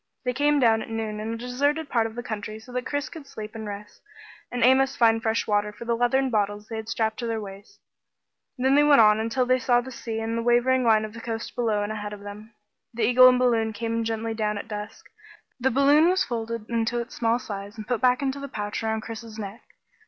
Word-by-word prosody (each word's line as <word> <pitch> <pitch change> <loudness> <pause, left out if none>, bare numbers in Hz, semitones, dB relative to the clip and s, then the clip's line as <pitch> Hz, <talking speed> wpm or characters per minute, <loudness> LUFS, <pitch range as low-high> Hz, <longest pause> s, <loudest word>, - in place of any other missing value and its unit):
They 250 -2 -1
came 290 +2 +2
down 225 -3 +4
at - - -8
noon 220 -1 -3
in 220 +1 -4
a 230 - -3
deserted 285 +6 -1
part 230 -4 +1
of 220 - -11
the 240 - -5
country 215 -1 -5
so 220 +3 -14
that 250 0 -3
Chris 290 0 -2
could 315 -4 -11
sleep 215 -5 -8
and 220 -2 -7
rest, 205 0 -9 0.5
and 245 - -1
Amos 265 +2 +4
find 225 -1 +3
fresh 225 0 0
water 210 0 +1
for 210 +3 -10
the 235 0 +1
leathern 255 +3 +1
bottles 205 -1 -1
they 225 - -5
had 220 0 -6
strapped 220 -1 -1
to 235 - -3
their 225 -1 -2
waists. 200 - -10 0.8
Then 260 +2 +2
they 290 +1 +5
went 295 -3 +6
on 210 -1 +6
until 230 +3 0
they 255 +1 +2
saw 245 -1 +3
the 255 +2 -7
sea 230 -2 -5
and 225 +1 -2
the 230 - -1
wavering 245 +2 +3
line 220 -2 +4
of 215 - -9
the 230 - -9
coast 230 -1 -5
below 220 -4 0
and 205 - -3
ahead 210 -1 -5
of 205 - -9
them. 210 +2 -10 0.4
The 235 - -1
eagle 250 +3 +7
and 250 - +3
balloon 230 -3 +2
came 230 +2 -2
gently 225 0 -2
down 210 -1 -1
at 205 - -6
dusk. 210 -1 -7 0.5
The 260 +2 +2
balloon 285 +6 +5
was 370 +1 +2
folded 230 -2 -4
into 230 0 -1
its 235 0 -6
small 230 0 +1
size 205 -2 -7
and 215 - -7
put 245 -2 -1
back 255 +1 +3
in 270 - +1
the 280 +1 -7
pouch 210 -5 -4
around 220 0 -1
Chris's 225 0 -8
neck. 205 +1 -7
230 Hz, 240 wpm, -25 LUFS, 215-250 Hz, 0.8 s, eagle